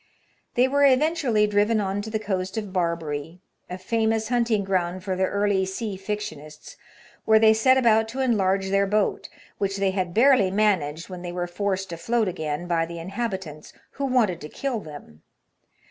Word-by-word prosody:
They 250 +1 +4
were 285 +2 +2
eventually 275 -5 +3
driven 210 +2 +2
on 200 0 -1
to 215 - -7
the 220 - -1
coast 190 -2 -3
of 205 -4 -4
Barbary 165 -3 -2 0.2
— - - -50
a 180 - -5
famous 220 +3 0
hunting 235 -4 +1
ground 185 -1 -1
for 190 -1 -2
the 190 0 +1
early 200 -1 +1
sea 195 +2 -4
fictionists 190 -7 -7 0.2
— - - -26
where 220 0 +5
they 220 0 +6
set 260 +4 +4
about 225 -3 +3
to 245 +4 -7
enlarge 195 -6 +1
their 195 0 +2
boat, 210 +1 0 0.3
which 195 0 -1
they 195 -1 +1
had 185 -2 -2
barely 235 -1 +4
managed 185 -6 0
when 180 -2 -8
they 175 -1 -5
were 175 0 -3
forced 190 +1 -3
afloat 220 +6 0
again 160 -2 -3
by 170 -2 +1
the 170 0 -8
inhabitants, 190 -4 -5 0.2
who 280 - -4
wanted 235 -10 +1
to 150 - -8
kill 270 - -3
them. 145 - -12
200 Hz, 180 wpm, -24 LUFS, 180-220 Hz, 0.3 s, they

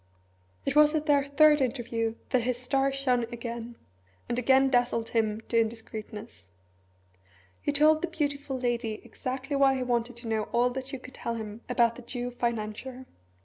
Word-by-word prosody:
It - - -1
was 300 +1 +6
at 305 0 0
their 285 -2 +4
third 295 +1 +5
interview 230 -3 -1 0.2
that 255 - +3
his 245 +1 -1
star 270 +2 +1
shone 255 -3 +1
again, 235 0 -6 0.5
and 240 - -1
again 265 +2 +5
dazzled 245 -2 +1
him 220 -1 0
to 230 - +3
indiscreetness. 220 - -6 1.1
He - - 0
told 305 +2 +4
the 355 - 0
beautiful 285 -4 -2
lady 235 -3 -1
exactly 265 +2 -4
why 275 -1 +4
he 260 - -1
wanted 240 -1 -1
to 235 0 -6
know 220 -1 0
all 245 +1 +3
that 260 +1 -5
she 270 - -5
could 255 0 -12
tell 235 - -4
him 220 0 -6
about 235 -2 +3
the - - -9
Jew 245 0 -5
financier. 240 +2 -3
245 Hz, 170 wpm, -28 LUFS, 230-270 Hz, 1.1 s, was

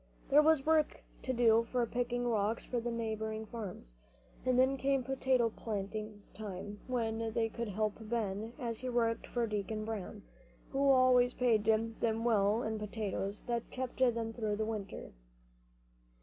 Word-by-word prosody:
There 290 +2 +7
was 310 -3 +4
work 315 -1 +2 0.2
to 260 - -2
do 230 -2 +4 0.2
picking 245 0 -1
rocks 220 0 0
for 245 - -1
the 235 +1 -3
neighboring 220 -1 -3
farmers; 200 - -7 0.5
and 255 -1 +2
then 260 +1 +4
came 270 0 +1
potato 260 -3 +1
planting 210 0 -5
time 205 0 -6
when 225 -3 -1
they 225 -1 +1
could 235 +1 -4
help 210 +1 -1
Ben 220 -1 -2
as 230 -3 -4
he 255 - -4
worked 230 -2 0
for 240 -1 0
Deacon 215 0 -3
Brown, 210 -1 -5 0.5
who 275 0 +2
always 255 -2 +5
paid 230 -4 +2
them 225 +1 +2 0.3
well 215 0 +3
in 220 0 -2
potatoes 205 -1 -3
that 235 -1 -2
kept 255 -1 -5
them 230 -3 +2
through 215 -3 -1
the 215 +1 -1
winter. 215 -3 -5
225 Hz, 150 wpm, -33 LUFS, 215-245 Hz, 0.5 s, There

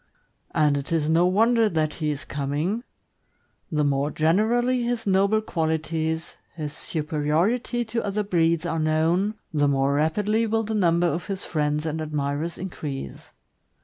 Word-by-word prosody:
And 150 -3 +2
it 140 +2 -5
is 160 -2 +1
no 165 +3 +4
wonder 225 +4 +3
that 155 -3 0
he 155 - +1
is 145 -1 -4
coming; 150 - -2 0.9
the 150 -2 +1
more 140 0 +1
generally 225 +11 +2
his 240 -1 -2
noble 200 +2 +3
qualities, 160 -2 -2 0.2
his 150 -3 -5
superiority 160 - -1
to 230 +1 -2
other 205 +1 -1
breeds, 170 -3 +1
are 165 -1 -1
known, 165 +7 +1 0.2
the 145 -1 +3
more 135 0 +2
rapidly 210 +10 +1
will 225 +1 +1
the 220 +1 -3
number 175 -4 +3
of 175 0 -1
his 195 -1 -4
friends 150 -1 -1
and 160 0 -2
admirers 150 +1 -2
increase. 145 - -6
165 Hz, 145 wpm, -25 LUFS, 150-205 Hz, 0.9 s, no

